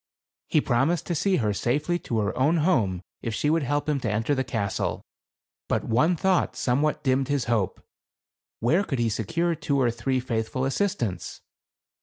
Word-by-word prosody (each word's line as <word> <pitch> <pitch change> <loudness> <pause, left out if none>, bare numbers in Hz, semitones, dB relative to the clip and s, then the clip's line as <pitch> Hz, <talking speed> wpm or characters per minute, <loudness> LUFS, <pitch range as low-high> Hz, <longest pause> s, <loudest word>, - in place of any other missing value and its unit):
He 155 - +3
promised 140 +7 +1
to 175 - -2
see 190 +4 +2
her 110 - +1
safely 150 - 0
to 115 - -3
her 100 0 -1
own 150 +6 +3
home 100 - +1 0.2
if 115 -2 -3
she 150 - +1
would 165 +1 +2
help 145 +2 -1
him 150 -2 +1
to 120 - -2
enter 110 +7 0
the 130 -1 0
castle. 110 -6 -2 0.6
But - - 0
one 150 +10 +2
thought 185 +2 +1
somewhat 140 +5 0
dimmed 130 -1 +2
his 145 -3 0
hope; 115 -5 0 0.8
where 160 - +3
could 140 -8 -3
he 120 -1 +1
secure 165 +9 0
two 140 -3 -1
or 120 -3 +3
three 125 +3 -1
faithful 125 +1 -2
assistants 135 - -2
135 Hz, 175 wpm, -26 LUFS, 115-155 Hz, 0.8 s, He